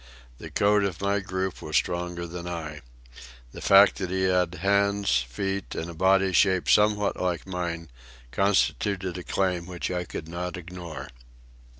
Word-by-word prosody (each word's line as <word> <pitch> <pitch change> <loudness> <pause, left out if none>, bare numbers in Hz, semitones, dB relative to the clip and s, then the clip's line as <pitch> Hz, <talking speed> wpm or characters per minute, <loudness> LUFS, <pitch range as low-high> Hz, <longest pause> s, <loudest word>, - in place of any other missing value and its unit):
The - - -8
code 105 0 +3
of 95 -4 -2
my 100 +1 +1
group 95 -1 -3
was 75 - -5
stronger 85 0 -1
than 85 +1 -7
I. 80 -4 -5 0.7
The - - -10
fact 100 +1 +6
that 95 -2 -3
he 95 +1 -1
had 90 -2 +2
hands, 100 -6 +2
feet, 95 +9 -3
and 85 +1 -4
a - - -9
body 95 +2 +3
shaped 95 +1 +3
somewhat 105 -1 +3
like 90 -2 -1
mine, 85 -4 -4 0.4
constituted 100 -1 +1
a - - -8
claim 90 -2 -1
which 90 0 -4
I 90 -1 -2
could 80 - -7
not 90 +2 -4
ignore. 90 -3 -8
90 Hz, 160 wpm, -26 LUFS, 85-95 Hz, 0.7 s, fact